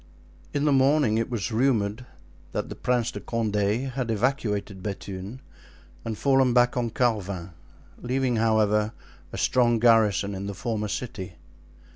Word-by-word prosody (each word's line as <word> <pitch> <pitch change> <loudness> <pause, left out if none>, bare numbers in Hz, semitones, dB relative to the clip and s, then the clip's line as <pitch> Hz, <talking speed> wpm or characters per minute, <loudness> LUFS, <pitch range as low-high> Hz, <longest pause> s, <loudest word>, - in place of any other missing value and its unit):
In 145 0 0
the 150 - +3
morning 135 -4 +3
it 115 - -2
was 120 -2 -3
rumored 115 -1 +1 0.5
that - - -4
Prince 125 -2 +1
de - - -6
Condé 110 +2 -1
had 125 -2 -3
evacuated 105 -4 -1
Bethune 100 +3 -6 0.6
and 110 -2 -4
fallen 135 -3 +3
back 120 0 +4
on 120 -2 0
Carvin, 100 -7 -1 0.5
leaving, 125 -1 0
however, 110 -1 +2 0.4
a - - -6
strong 120 -2 +3
garrison 110 -4 +3
in 95 +1 -5
the 100 - -5
former 110 0 -2
city. 100 -5 -5
115 Hz, 135 wpm, -26 LUFS, 105-125 Hz, 0.6 s, back